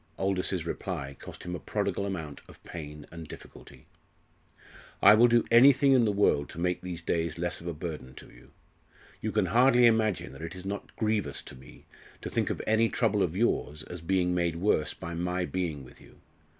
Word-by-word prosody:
Aldous's 95 -3 -1
reply 80 -6 -4
cost - - -10
him 90 - -5
a 90 - -4
prodigal 100 - -2
amount 80 -7 -5
of - - -17
pain 75 -3 -8
and 85 -1 -9
difficulty. - - -13 1.1
"I 100 - +8
will 115 +3 +6
do 120 -1 +3
anything 135 +3 +7
in 125 -3 +5
the 105 - +2
world 100 -8 +2
to - - -9
make 90 +1 0
these 90 -2 -6
days 85 -2 -1
less 85 +1 -3
of 85 - -8
a 85 - -2
burden 75 -6 -7
to - - -13
you. - - -18 0.7
You - - -2
can - - +1
hardly 125 +1 +5
imagine 110 - +2
that 70 - -11
it 80 +3 -6
is 90 0 -9
not 100 +1 -6
grievous 105 -10 -1
to - - -11
me 65 +1 -16 0.4
to - - -5
think - - 0
of - - -3
any 110 +1 +3
trouble 105 -4 +1
of 90 -1 0
yours 75 -9 0
as 90 -2 -8
being 90 +1 +1
made 85 -2 0
worse 85 -3 0
by 85 -1 -7
my 90 +2 -1
being 85 -7 -3
with 65 - -16
you. - - -18
90 Hz, 200 wpm, -29 LUFS, 80-105 Hz, 1.1 s, I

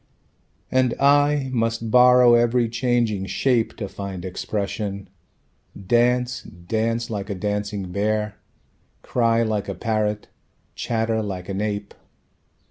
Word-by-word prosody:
And 130 -2 +2
I 145 -1 +3
must 115 -1 -1
borrow 125 0 +7
every 120 0 +3
changing 115 -4 0
shape 115 +4 +1
To 105 - -4
find 95 -2 -7
expression... 100 0 -4 0.7
dance, 120 +4 +1
dance 115 +6 -3
Like 100 -1 -4
a 100 - -2
dancing 105 -1 -3
bear, 105 +2 -1 0.7
Cry 115 -1 +2
like 105 -3 -2
a 100 - -3
parrot, 105 +1 -1 0.5
chatter 115 -1 -1
like 95 -3 -5
an 95 +1 -2
ape. 105 -1 -3
110 Hz, 115 wpm, -23 LUFS, 100-120 Hz, 0.7 s, borrow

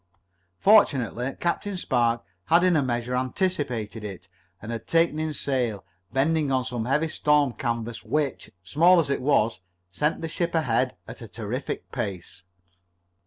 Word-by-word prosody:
Fortunately 135 - +3
Captain 190 +3 -1
Spark 120 -7 +1 0.2
had 170 +2 +4
in 180 -2 +4
a 150 - +4
measure 120 -1 -1
anticipated 125 - -2
it, 95 -4 -7 0.3
and 105 - -7
had 115 -1 -6
taken 165 -2 +2
in 155 0 -1
sail, 125 -8 -2 0.3
bending 145 +1 +1
on 130 -1 +1
some 120 -2 -3
heavy 145 +6 +1
storm 150 -4 +2
canvas 115 -2 -3
which, 150 -3 -2
small 170 - +5
as 145 -4 0
it 140 - -1
was, 120 -6 +2 0.3
sent 150 - 0
the - - -1
ship 170 +1 -2
ahead 130 -4 +1
at - - -10
a 115 - -8
terrific 115 +5 -5
pace. 100 -8 -5
130 Hz, 150 wpm, -25 LUFS, 115-155 Hz, 0.3 s, small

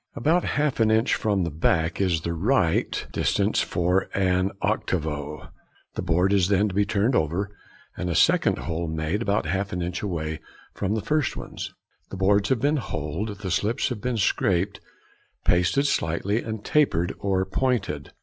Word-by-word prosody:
About 165 +7 +2
half 145 -3 0
an 110 -1 +4
inch 110 +3 +3
away - - -1
from 100 -4 +1
the 85 - -2
back 80 +3 +1
is 90 -4 +1
the 85 +1 -2
right 90 -1 +1
distance - - +1
for 90 +2 0
an 95 -1 +2
|58| - - -12
octavo. 75 - -2 0.4
The - - -3
board 90 +4 +2
is 95 -3 +3
then 100 +1 +2
to - - -6
be 100 +2 +2
turned 105 +5 +1
over, 90 +7 -1 0.4
and 90 - -3
a 85 - -1
second - - +4
hole 85 0 -3
made 80 +6 -2
about 100 -6 0
half 95 +5 -1
an 90 -1 -2
inch 90 +1 -3
away 80 -5 -3 0.3
from 100 +2 -1
the 110 - -1
first 150 -5 0
ones. - - -7 0.3
The 95 - -7
boards 100 +2 +3
having 130 -3 +1
been 145 +3 +2
holed, 95 - -4
the 95 -3 -3
slips 105 +9 0
must 110 -4 -4
be 125 -2 -1
scraped, 95 -1 +1 0.6
pasted 90 +11 +3
slightly, 100 - 0
and 110 -2 -6
tapered 95 - +2
or 95 -1 0
pointed. 95 - -1
95 Hz, 180 wpm, -25 LUFS, 85-110 Hz, 0.6 s, an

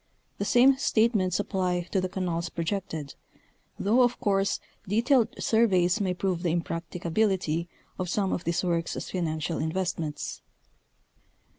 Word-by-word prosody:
The 200 - -1
same 260 +5 +5
statements 215 -8 +2
apply 185 -3 0
to 190 - +2
the 185 - -2
canals 175 -2 -2
pro 170 - -3
jected, 165 -6 -3 0.6
though 225 +6 +3
of 245 -1 +2
course 195 -1 +1 0.3
detailed 235 +4 +3
surveys 200 -3 +3
may 185 -2 0
prove 180 -2 -1
the 170 -2 +1
imprac 165 -1 -2
ticability 175 -2 0 0.3
of 180 -1 -2
some 195 +1 0
of - - -2
these 170 +2 0
works 170 -2 0
as - - -6
financial 160 -2 -2
investments. 160 -2 -3
185 Hz, 140 wpm, -27 LUFS, 170-205 Hz, 0.6 s, same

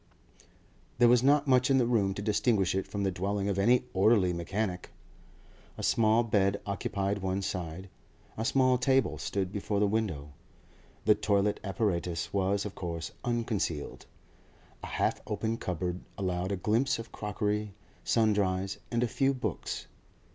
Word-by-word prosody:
There 120 0 +6
was 120 0 +5
not 145 +2 +4
much 130 -1 +4
in 135 - +4
the 125 - +3
room 105 -5 +1
to 100 - -5
distinguish 105 -2 +2
it 95 0 -1
from 100 -1 -3
the 95 - +1
dwelling 100 +2 -2
of 100 -1 -1
any 120 +5 +4
orderly 95 -2 +4
mechanic. 90 +2 -3 0.9
A - - -6
small 110 +1 +3
bed 100 -3 +1
occupied 100 0 -2
one 95 0 -2
side; 90 0 -4 0.5
a 110 - -3
small 130 0 +3
table 130 +1 +2
stood 95 -2 -2
before 100 0 -2
the 105 - +4
window; 95 -9 -2 0.7
the 105 - +7
toilet 105 0 +1
apparatus 90 -5 -2
was, 100 +1 +1
of 100 - -5
course, 85 -2 -5
unconcealed; 115 -10 -2 0.7
a - - -6
half - - -1
open 110 +2 -2
cupboard 90 -1 -3 0.2
allowed 90 -1 -2
a - - +1
glimpse 110 +8 +1
of 115 0 -8
crockery, 105 0 -2 0.3
sundries, 100 -4 +1
and 120 0 0
a - - +2
few 135 +3 +1
books. 110 -8 -4
100 Hz, 150 wpm, -30 LUFS, 95-115 Hz, 0.9 s, the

